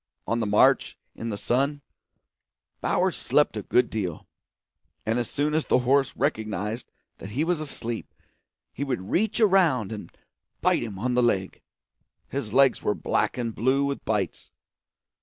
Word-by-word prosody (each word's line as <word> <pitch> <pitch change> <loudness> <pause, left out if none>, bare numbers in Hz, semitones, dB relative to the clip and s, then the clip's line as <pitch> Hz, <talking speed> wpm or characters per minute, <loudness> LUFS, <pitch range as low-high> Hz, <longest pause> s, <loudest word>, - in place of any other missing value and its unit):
On 115 - 0
the 110 - 0
march, 105 +1 +4 0.2
in 115 - -5
the 105 - -3
sun, 140 +6 0 1.0
Bowers - - +1
slept - - +2
a - - -2
good 125 -1 +2
deal; 90 -7 -3 0.8
and 115 +2 +1
as 120 - -2
soon 150 +2 0
as 155 0 0
the - - +4
horse 135 +2 +2
recognised 110 - -2 0.3
that 95 - -8
he 130 +9 -1
was 170 -1 0
asleep 120 -6 -5 0.6
he 140 - -3
would 125 -9 -3
reach 215 +4 +1
around 175 - +3
and 105 -2 -7 0.5
bite - - +2
him 105 -5 -5
on 125 +5 -1
the 125 - +3
leg. 95 -6 0 0.7
His 135 -6 -4
legs 135 +2 +4
were 105 - 0
black - - 0
and 115 -2 -2
blue 130 +5 +2
with 140 0 -3
bites. 105 -5 -2
120 Hz, 160 wpm, -26 LUFS, 110-140 Hz, 1.0 s, march